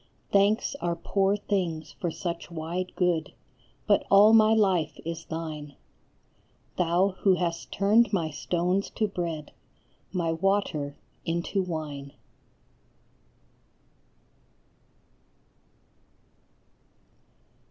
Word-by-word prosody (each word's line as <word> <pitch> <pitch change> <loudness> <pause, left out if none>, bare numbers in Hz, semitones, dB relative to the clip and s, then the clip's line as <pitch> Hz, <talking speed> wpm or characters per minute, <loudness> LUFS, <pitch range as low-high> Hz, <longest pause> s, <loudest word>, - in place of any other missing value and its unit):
Thanks 200 +3 +3
are 170 -1 0
poor 195 +3 +1
things 170 -6 -2
for 175 - -3
such 170 +1 -5
wide 170 +2 -4
good, 175 -4 0 0.5
but - - +3
all 205 +3 +7
my 220 -1 +6
life 190 -8 +2
is 165 0 -5
thine, 155 -3 -6 1.0
Thou 180 +2 +2
who 190 -2 +4
hast 170 -2 -3
turned 210 +3 +3
my 165 -6 0
stones 180 +5 -1
to 215 - +1
bread, 170 -6 -4 0.6
my 170 -3 0
water 165 -5 0 0.3
into 170 +3 -1
wine. 150 -5 -5
175 Hz, 90 wpm, -27 LUFS, 160-195 Hz, 1.0 s, all